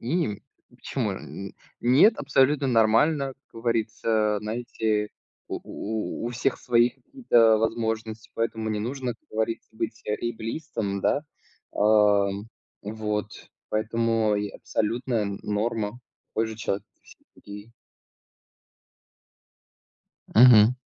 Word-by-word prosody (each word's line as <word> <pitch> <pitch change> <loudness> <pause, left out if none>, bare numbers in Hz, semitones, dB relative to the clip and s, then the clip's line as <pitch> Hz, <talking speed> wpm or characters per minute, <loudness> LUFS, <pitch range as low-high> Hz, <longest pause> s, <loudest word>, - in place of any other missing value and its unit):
М, 125 - -1 0.3
почему? - - -3
Н 100 0 -8 0.3
нет, 140 - +5
абсолютно 140 0 +2
нормально. 130 +5 +3
Как 115 - -11
говорится, 110 -2 +1
знаете, 110 -1 -1 0.4
у - - -3
у 110 +2 -4
у - - -2
всех 125 +2 -1
свои 120 0 +3
какие-то 120 - +3
возможности, 110 -1 -2
поэтому 110 -1 -2
не 105 -1 -1
нужно, 125 +1 -3
как - - -36
говорится, 110 +1 -2
быть 110 +1 -4
эйблистом, 115 -1 -3
да. 140 - +1 0.5
А, 105 -1 +4 0.5
вот. 105 0 -3 0.4
Поэтому 115 0 +1
и 105 0 -2
абсолютная 115 +2 -1 0.2
норма, 110 +2 -2 0.3
такой 110 - -1
же 110 0 -7
человек, 100 -2 -2
как - - -44
и - - -30
все - - -16 0.2
другие. 105 +3 -11 2.6
Мгм. 115 -1 +8
115 Hz, 110 wpm, -26 LUFS, 105-120 Hz, 2.6 s, Мгм